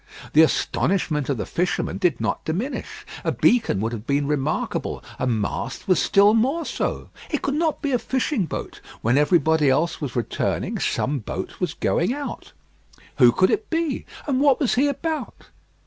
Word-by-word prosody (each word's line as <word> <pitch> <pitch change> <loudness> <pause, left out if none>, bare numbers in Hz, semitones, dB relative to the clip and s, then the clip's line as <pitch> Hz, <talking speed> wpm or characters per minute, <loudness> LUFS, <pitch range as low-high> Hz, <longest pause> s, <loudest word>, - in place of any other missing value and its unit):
The 155 - +7
astonishment 160 -2 +1
of 140 - 0
the - - -3
fisherman 180 +2 -1
did 180 -7 +1
not 110 -2 -2
diminish. 205 - -4 0.2
A - - +1
beacon 230 - +2
would 110 +1 -1
have 115 -1 -7
been 140 0 +1
remarkable; 150 +1 -2 0.2
a 130 - 0
mast 110 -4 -2
was 185 - +3
still 200 +2 +5
more 270 +9 +1
so: - - -3 0.2
it 300 - -2
could 275 - 0
not 315 +1 0
be 285 - 0
a 250 - +2
fishing 260 - -1
boat. - - -6 0.2
When 115 +3 +3
everybody 155 0 +3
else 160 +6 +1
was 140 -5 -4
returning, 120 - -1
some 140 +1 0
boat 110 - -6
was - - -2
going 200 +10 0
out. 290 -1 -6 0.7
Who 125 -3 +8
could 185 +9 +3
it - - -1
be? 330 -4 -1 0.2
and 270 -3 0
what 280 -3 +4
was 275 - +1
he 270 +4 +3
about? 310 +3 -4
180 Hz, 175 wpm, -23 LUFS, -, 0.7 s, Who